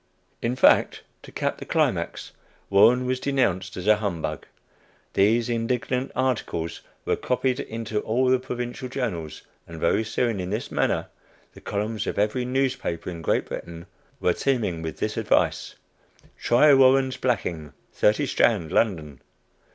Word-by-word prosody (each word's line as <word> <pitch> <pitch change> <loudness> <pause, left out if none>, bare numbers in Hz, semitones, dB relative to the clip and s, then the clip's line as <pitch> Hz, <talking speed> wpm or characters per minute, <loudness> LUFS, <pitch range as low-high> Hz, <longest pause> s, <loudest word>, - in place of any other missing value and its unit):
In 120 +2 -1
fact, 130 - +4 0.2
to - - -13
cap - - -2
the - - -7
climax, - - -1 0.4
Warren 120 +6 +5
was 130 0 -1
denounced 95 -10 0
as 90 - -5
a 105 0 +5
"humbug." 100 -7 -4 0.7
These 110 +4 +3
indignant 120 +2 -1
articles 120 -10 -2 0.2
were - - +1
copied 130 +1 -1
into 110 -3 -3
all 125 +5 0
the 130 0 +4
Provincial 125 0 -5
journals, 95 - -4 0.2
and 85 -1 -9
very 85 +7 +2
soon, 110 -1 -1
in 90 0 -4
this 105 +4 -4
manner, - - 0 0.5
the - - -14
columns 105 +2 -3
of - - -3
every 105 +5 0
newspaper 130 -10 -2
in 85 -2 -7
Great - - 0
Britain 85 0 -8 0.3
were 90 - +2
teeming 110 -12 -1
with 80 -1 -5
this - - -3
advice: - - +1 0.6
"Try 145 +5 +5
Warren's 130 0 +4
Blacking, 85 - -2 0.2
30 105 +8 +2
Strand, 100 - +1
London." 80 - 0
115 Hz, 145 wpm, -25 LUFS, 90-125 Hz, 0.7 s, Warren